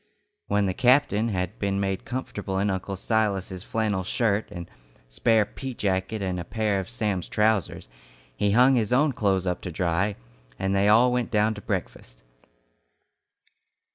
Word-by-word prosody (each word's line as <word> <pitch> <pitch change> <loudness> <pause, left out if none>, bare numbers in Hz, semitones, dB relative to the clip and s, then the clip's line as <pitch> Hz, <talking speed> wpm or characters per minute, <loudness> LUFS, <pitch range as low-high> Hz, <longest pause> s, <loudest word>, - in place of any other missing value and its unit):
When 100 0 +1
the 95 - 0
captain 125 -1 +3
had 95 +1 -3
been 100 -1 -1
made 95 -1 -2
comfortable 105 -6 -4
in 100 +1 +1
Uncle 95 +1 -3
Silas's 95 -3 -1
flannel 105 -4 -1
shirt 110 +1 0
and 85 -1 -8 0.4
spare 110 - +2
pea 130 +4 -7
jacket 100 +1 -1
and 90 -1 -2
a - - -4
pair 105 +1 -1
of 95 - -6
Sam's 105 -7 -2
trousers, 105 - 0 0.5
he 100 - +1
hung 125 +6 +5
his 115 -4 +1
own 140 +3 +3
clothes 95 -5 0
up 90 -1 -2
to 90 - -5
dry, 90 +4 0 0.4
and 95 0 -1
they 100 +1 +3
all 120 +4 +5
went 125 -1 -1
down 110 0 +2
to 105 - -9
breakfast. - - -5
100 Hz, 160 wpm, -25 LUFS, 95-110 Hz, 0.5 s, hung